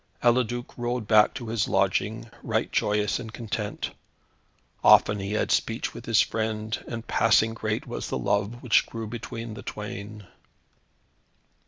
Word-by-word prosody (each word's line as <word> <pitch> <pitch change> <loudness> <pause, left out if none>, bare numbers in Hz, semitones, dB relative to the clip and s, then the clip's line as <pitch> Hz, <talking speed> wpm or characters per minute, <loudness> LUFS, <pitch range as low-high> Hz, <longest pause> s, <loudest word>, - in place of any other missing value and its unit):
Eliduc 120 0 +1
rode 120 -2 -2
back 105 -1 +6
to 120 -5 -6
his 110 -2 0
lodging, - - 0
right - - -1
joyous 105 0 +1
and 110 -2 -7
content. 110 -2 -4 0.9
Often 105 - +6
he 100 +1 -3
had 105 - 0
speech - - 0
with - - -10
his - - +5
friend, 110 0 -2
and 115 -1 -5
passing 110 0 +3
great 110 -1 -2
was - - -5
the - - -1
love 105 +4 -1
which 120 -3 +4
grew 115 -1 -5
between 115 0 -6
the 105 - -8
twain. 105 0 -7
110 Hz, 145 wpm, -26 LUFS, 105-115 Hz, 0.9 s, back